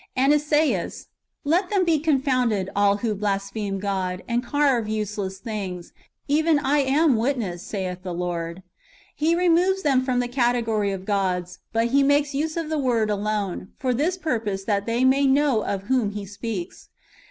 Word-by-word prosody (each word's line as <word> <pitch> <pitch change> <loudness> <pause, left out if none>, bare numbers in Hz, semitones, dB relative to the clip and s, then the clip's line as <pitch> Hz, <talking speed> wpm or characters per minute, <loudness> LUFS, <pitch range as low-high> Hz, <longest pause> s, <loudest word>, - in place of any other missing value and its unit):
And 270 +3 +4
Esaias: 295 - 0 0.2
" - - -56
Let 345 +5 +1
them 390 -3 +2
be 325 -3 +3
confounded, 255 - +1
all 200 0 +3
who 220 - +1
blaspheme 200 0 -2
God, 190 -2 -2
and 240 +1 0
carve 265 -3 +1
useless 210 -3 -3
things;^ 190 -5 -5 0.4
even 310 +2 +3
I 290 +1 +1
am 275 0 +3
witness, 225 -8 -1
saith 185 -3 -4
God." 180 -2 -4
^ 175 0 -4 0.5
Here 335 +4 +1
moves 365 +3 +3
them 270 -4 +3
from 255 -1 0
[the 245 - 0
category 240 -5 +1
of] 190 -1 -5
gods, 185 -3 -1
but 230 +1 +1
he 280 +3 +4
makes 285 +1 +2
use 310 +4 -2
of 320 -2 -3
the 310 - 0
word 230 -5 +1
alone, 205 -3 -2
for 260 -4 0
this 320 +9 0
[purpose], 225 - -2
that 200 0 -1
we 235 +3 +1
may 275 +1 +4
know 270 -5 +3
of 195 -1 -3
whom 245 -1 +1
he 205 -1 -5
speaks. 200 -2 -6
235 Hz, 170 wpm, -24 LUFS, 200-285 Hz, 0.5 s, And